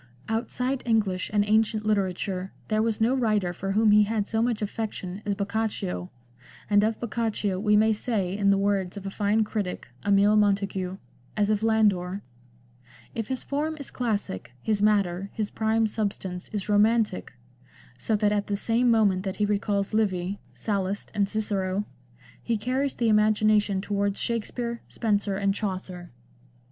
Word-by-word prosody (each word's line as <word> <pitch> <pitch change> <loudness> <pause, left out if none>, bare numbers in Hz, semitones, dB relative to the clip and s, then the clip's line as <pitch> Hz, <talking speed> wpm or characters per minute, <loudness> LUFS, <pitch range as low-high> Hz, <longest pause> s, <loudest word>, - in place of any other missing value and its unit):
Outside 250 +4 -1
English 210 -6 +1
and 205 -1 +2
ancient 215 0 +2
literature 190 -2 -1 0.2
there 215 0 +2
was 225 -1 0
no 230 +3 +3
writer 215 -8 +1
for 195 +2 -3
whom 215 +1 +4
he 210 0 +7
had 210 0 +1
so 220 +1 -1
much 230 -2 0
affection 205 -3 -4
as 200 - +1
Boccaccio, 200 - -2 0.6
and 205 0 +4
of 220 +1 0
Boccaccio 215 -4 -1
we 210 +1 +3
may 220 +1 +4
say, 205 -4 -1
in 200 -1 +2
the 200 - +4
words 195 -1 0
of 200 - -7
a 195 - -3
fine 210 +2 +2
critic, 205 - -4
Emile 205 +1 +4
Montegut, 195 -3 +1 0.4
as 210 0 +2
of 210 -1 +1
Landor, 205 -4 +2 0.4
" 120 -1 -26
If 225 -2 -3
his 260 -2 -3
form 305 +2 -2
is 280 - -6
classic, 205 - -3
his 210 -2 +1
matter, 200 -3 +2
his 215 -2 -2
prime 220 0 +1
substance 195 -4 -3
is 205 -3 -3
romantic, 210 -1 +2 0.7
so 220 - +1
that 205 0 +2
at 205 -1 0
the 205 - -1
same 235 +4 +2
moment 210 -5 +3
that 190 -1 -4
he 210 - +1
recalls 205 0 0
Livy, 195 -3 0
Sallust, 200 -1 -3
and 200 -2 +1
Cicero, 200 -2 -1 0.6
he 230 -1 -1
carries 255 +5 -1
the 235 - 0
imagination 210 -2 +3
towards 200 0 -1
Shakspere, 235 +1 -3
Spenser 205 -3 0
and 200 0 +1
Chaucer." 185 -4 -5
210 Hz, 160 wpm, -26 LUFS, 195-220 Hz, 0.7 s, he